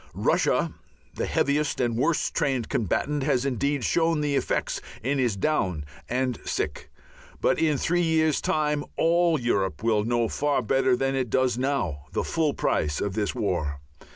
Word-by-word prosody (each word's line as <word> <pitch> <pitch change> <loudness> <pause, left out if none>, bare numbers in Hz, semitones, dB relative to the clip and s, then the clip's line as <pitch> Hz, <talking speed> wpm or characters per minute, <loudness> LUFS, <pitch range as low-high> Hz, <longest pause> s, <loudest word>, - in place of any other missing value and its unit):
Russia, - - +1 0.4
the - - -3
heaviest 145 +2 +1
and 120 -2 +1
worst 155 +7 +1
trained 135 -7 0
combatant, 140 - 0
has 130 -1 +1
indeed 140 +1 0
shown 165 +2 +2
the 145 -1 0
effects - - -1 0.2
and 135 +3 0
is 120 -5 +1
down 95 - 0 0.2
and 125 -1 -1
sick, 75 - -3 0.5
but - - +2
in 155 -3 +2
three 175 +5 +1
years' 160 -2 +2
time 150 -1 0
all 170 -1 +3
Europe 100 -6 -1
will 110 -2 +2
know 120 0 +1
far 145 +2 0
better 130 +2 +2
than 135 +2 0
it 130 -3 -1
does 130 +1 +2
now 120 - -1
the - - 0
full 155 -3 0
price 75 -1 0
of 100 - -2
this 105 +2 -1
war. 85 - -1
130 Hz, 160 wpm, -26 LUFS, 110-150 Hz, 0.5 s, all